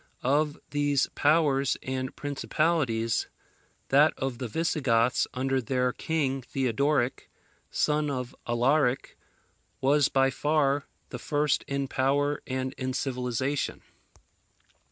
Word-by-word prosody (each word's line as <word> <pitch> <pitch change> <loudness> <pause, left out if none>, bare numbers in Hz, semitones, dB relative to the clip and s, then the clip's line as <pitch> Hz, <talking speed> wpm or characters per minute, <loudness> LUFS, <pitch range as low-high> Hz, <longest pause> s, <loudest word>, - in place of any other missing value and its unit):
Of 145 +3 +1
these 145 -1 +2
powers 145 -3 +2
and 130 0 -3
principalities, 135 -4 0 0.6
that 145 +3 +5
of 130 -3 -3
the 125 - -3
Visigoths, 125 -4 +1
under 135 +1 0
their 125 +1 0
king 140 -4 -1
Theodoric, 130 +1 0 0.4
son 150 0 +1
of 125 -3 -4
Alaric, 125 +3 +1 0.6
was 140 +1 +3
by 135 0 +3
far 145 0 +1 0.2
the 125 - -6
first 145 +2 0
in 140 0 -2
power 140 +3 +1
and 130 0 -2
in 130 0 -2
civilization. 130 +1 -2
135 Hz, 105 wpm, -28 LUFS, 125-145 Hz, 0.6 s, that